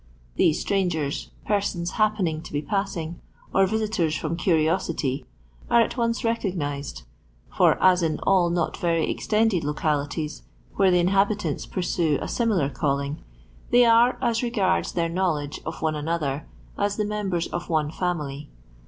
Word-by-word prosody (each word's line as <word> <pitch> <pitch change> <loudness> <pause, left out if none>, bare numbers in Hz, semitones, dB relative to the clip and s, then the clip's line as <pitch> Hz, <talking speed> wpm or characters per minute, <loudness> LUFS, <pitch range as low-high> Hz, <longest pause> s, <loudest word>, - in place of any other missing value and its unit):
These 155 - +3
strangers, 175 -8 -1 0.2
persons 195 -4 -1
happening 205 -8 +1
to - - -11
be 145 +1 -2
passing, 175 -3 -3 0.3
or 195 0 +4
visitors 210 -7 0
from 160 +1 -2
curiosity, 160 -6 0 0.4
are 235 - +5
at 230 - 0
once 230 -1 0
recognised; 170 - -2 0.5
for - - +4
as 185 -1 +5
in 160 -2 0
all 185 -3 +3
not 170 -1 0
very 165 -2 +1
ex - - -4
tended 215 -4 +3
hicalities, 150 0 -2 0.3
where 195 -1 +3
the 180 - +4
inhabitants 195 -2 +1
pursue 175 -4 0
a - - -4
abniiar 195 - 0
calling, 140 +1 -1 0.5
they 245 0 +6
are, 235 +2 +5
as 235 -2 +1
regards 205 - +1
their 170 -1 0
know 180 +1 +1
ledge 145 -1 -5
of 160 - -5
one 160 -1 +1
another, 150 -2 -2 0.3
as 205 0 +1
the 210 - 0
members 200 -5 -1
of 175 0 -5
one 155 -2 +1
fiunily. 150 -5 -3
175 Hz, 150 wpm, -25 LUFS, 155-200 Hz, 0.5 s, they